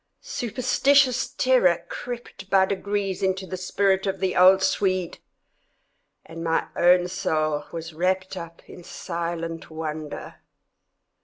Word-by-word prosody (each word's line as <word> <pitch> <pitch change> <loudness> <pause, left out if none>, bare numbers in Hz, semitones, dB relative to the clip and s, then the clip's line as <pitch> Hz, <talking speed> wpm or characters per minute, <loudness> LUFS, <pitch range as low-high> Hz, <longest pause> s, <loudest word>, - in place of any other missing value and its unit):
Superstitious 255 +2 +2
terror 185 -10 +2
crept 240 -5 -8
by 195 -1 +5
degrees 200 0 -2
into 190 0 0
the 185 - -5
spirit 190 +1 0
of 195 0 -2
the 190 -1 -1
old 190 +1 +6
Swede, 185 -2 0 1.1
and 165 +1 -8
my 165 -1 +1
own 180 0 +4
soul 155 -4 -1
was 165 -1 -6
wrapped 185 +3 -1
up 170 -2 -9
in 175 - -12
silent 170 -1 -5
wonder. 155 -1 -6
185 Hz, 115 wpm, -24 LUFS, 170-195 Hz, 1.1 s, old